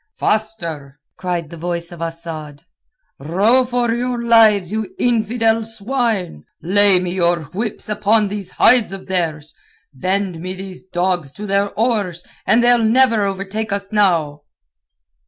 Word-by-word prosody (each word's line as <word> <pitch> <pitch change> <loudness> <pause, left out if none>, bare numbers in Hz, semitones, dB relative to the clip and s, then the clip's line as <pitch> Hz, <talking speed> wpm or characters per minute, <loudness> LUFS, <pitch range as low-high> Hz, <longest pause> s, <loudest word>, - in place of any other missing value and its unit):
"Faster!" 170 -10 -2 0.2
cried 175 -4 -4
the 170 - -8
voice 170 0 -3
of 170 -1 -10
Asad. 165 -3 -6 0.6
"Row 200 - +3
for 245 -2 0
your 245 +1 -2
lives, 220 -6 +4
you 215 -2 -4
infidel 225 -1 +1
swine! 225 - -2 0.2
Lay 195 +1 +5
me 180 -1 -3
your 175 -2 +1
whips 215 +3 -4
upon 210 0 +2
these 200 -2 -5
hides 245 0 +4
of 195 -1 -8
theirs! 160 -5 -3 0.4
Bend 185 +4 -2
me 185 +2 -5
these 190 -1 -9
dogs 175 -5 -2
to 210 - -7
their 200 0 +1
oars, 205 -7 0 0.2
and 235 - +4
they'll 240 -1 +4
never 230 0 +4
overtake 200 +3 -4
us 200 0 -2
now." 170 -8 +1
195 Hz, 140 wpm, -18 LUFS, 175-225 Hz, 0.6 s, Lay